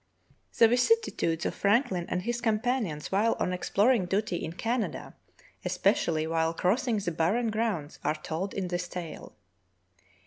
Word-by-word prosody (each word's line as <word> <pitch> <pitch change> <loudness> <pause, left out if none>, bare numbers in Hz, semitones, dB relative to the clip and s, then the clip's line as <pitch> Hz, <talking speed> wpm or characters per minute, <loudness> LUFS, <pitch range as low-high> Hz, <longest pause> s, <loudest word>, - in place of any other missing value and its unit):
The 230 - +8
vicissitudes 245 - +1
of - - 0
Franklin 200 -4 +1
and 180 0 -1
his 240 +2 -2
companions 220 - -1
while 210 +4 +2
on 180 - 0
exploring 200 +3 +2
duty 195 -1 0
in 160 -1 -5
Canada, 230 +5 -2 0.5
especially 160 -2 +1
while 165 0 0
crossing 225 +6 +1
the 195 -4 -2
barren 200 +9 +1
grounds, 200 -11 -2
are 150 +2 +1
told 160 +5 -4
in 190 -2 -2
this 175 0 -2
tale. 175 -2 -7
190 Hz, 140 wpm, -28 LUFS, 165-230 Hz, 0.5 s, The